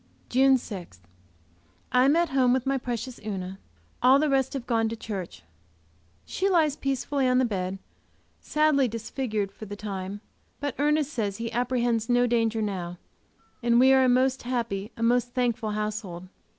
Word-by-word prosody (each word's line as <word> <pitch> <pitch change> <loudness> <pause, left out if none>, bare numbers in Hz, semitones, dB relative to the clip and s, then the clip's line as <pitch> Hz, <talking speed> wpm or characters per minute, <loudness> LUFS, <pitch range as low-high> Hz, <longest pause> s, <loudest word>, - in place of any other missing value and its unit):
JUNE 265 +1 +5
6. 185 - -8 0.9
I 250 +1 +4
am 285 +3 +4
at 340 -1 +2
home 255 -2 +3
with 260 0 0
my 270 0 +1
precious 245 0 -5
Una, 195 -2 -5 0.4
all 255 +2 +6
the 300 0 +1
rest 265 -1 +1
having 265 -3 -4
gone 225 -2 +1
to 230 - -4
church. 190 - -6 0.8
She 390 +2 -1
lies 315 -6 +3
peacefully 275 -1 -1
on 250 0 +3
the 260 - +3
bed, 190 -4 -2 0.6
sadly 300 -3 +2
disfigured, 225 -2 -3
for 215 - -10
the 205 - -6
time, 200 -1 -5 0.4
but 285 -3 -2
Ernest 300 0 +1
says 205 -4 -2
he 230 0 -4
apprehends 240 -1 0
no 245 0 +4
danger 225 -2 +1
now, 180 -4 -4 0.6
and 235 0 +3
we 265 +1 +6
are 265 0 +5
a 255 - +4
most 260 +1 +2
happy, 235 -4 -3
a 230 - -3
most 245 +1 +1
thankful 235 -3 0
household. 210 -4 -4
240 Hz, 165 wpm, -26 LUFS, 210-265 Hz, 0.9 s, all